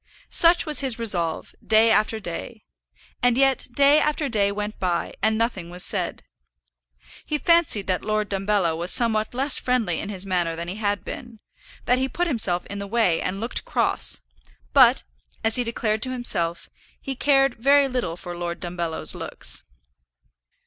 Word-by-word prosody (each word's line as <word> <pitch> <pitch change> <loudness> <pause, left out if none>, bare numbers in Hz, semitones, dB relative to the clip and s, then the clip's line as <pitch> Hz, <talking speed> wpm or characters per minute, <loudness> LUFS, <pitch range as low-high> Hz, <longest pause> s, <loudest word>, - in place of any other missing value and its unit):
Such 340 +1 +4
was 305 -2 +2
his 265 -5 0
resolve, 180 -8 -1
day 225 +1 +4
after 220 0 +1
day. 210 +4 -7 0.6
And 245 -1 +2
yet 270 -1 +2
day 285 +4 +5
after 300 -1 0
day 205 -5 +1
went 210 +1 -5
by, 175 -2 -2
and 220 0 +2
nothing 220 -7 -2
was 180 +1 -1
said. - - 0 1.0
He 300 - -2
fancied 330 - +3
that 185 -1 -1
Lord 215 0 -1
Dumbello 195 -4 0
was 170 +2 -2
somewhat 220 -1 +2
less 270 +2 -1
friendly 230 -10 0
in 205 - -5
his 195 -2 -5
manner 175 -3 -1
than 170 +1 -6
he 185 +4 -5
had 205 -2 -2
been, 240 -4 -8 0.5
that 250 +1 +2
he 265 +1 -1
put 350 +7 -1
himself 205 - +1
in 200 - -7
the 200 - -5
way 215 -6 +1
and 190 +2 -3
looked 230 +3 -1
cross; - - +1 0.5
but, - - +6 0.4
as 225 +1 +1
he 245 - +1
declared 220 -2 -2
to 255 - 0
himself, 175 -9 +1 0.3
he 270 - -5
cared 270 0 +3
very 275 +4 +3
little 245 -11 -3
for 175 -1 -8
Lord 175 0 -5
Dumbello's 170 -2 -4
looks. - - -4
215 Hz, 170 wpm, -23 LUFS, 185-255 Hz, 1.0 s, but